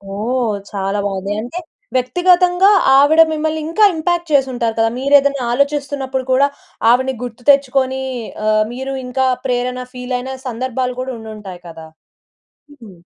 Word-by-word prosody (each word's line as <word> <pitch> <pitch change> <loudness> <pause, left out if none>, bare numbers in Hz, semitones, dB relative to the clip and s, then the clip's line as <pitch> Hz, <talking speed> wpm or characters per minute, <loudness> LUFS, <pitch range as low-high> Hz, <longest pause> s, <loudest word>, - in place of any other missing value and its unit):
ఓహ్! 230 +1 -1 0.2
చాలా 195 0 -2
బాగుంది. 195 0 -3
అంటే 245 +10 -6 0.4
వ్యక్తిగతంగా 355 +7 +3 0.3
ఆవిడ 300 +4 +6
మిమ్మల్ని 315 0 -2
ఇంకా 335 +7 +1
ఇంపాక్ట్ 345 +1 -1
చేసుంటారు 250 -5 +1
కదా! 225 0 +3
మీరేదన్న 280 +1 +3
ఆలోచిస్తున్నప్పుడు 280 0 -1
కూడా, 270 +2 +4 0.4
ఆవిడని 260 +2 +3
గుర్తు 245 0 -8
తెచ్చుకొని 265 -1 +2 0.5
ఆహ్, 215 0 +3
మీరు 265 +2 -5
ఇంకా 260 +1 0 0.2
ప్రేరణ 250 0 -1
ఫీల్ 250 0 -4
అయిన 260 +2 -6 0.2
సందర్భాలు 250 +1 -3
కూడా 260 0 -4
ఉండుంటాయి 210 -5 -9
కదా! 160 -1 -10 0.8
హుహు. 240 -9 -14
260 Hz, 130 wpm, -17 LUFS, 235-280 Hz, 0.8 s, ఆవిడ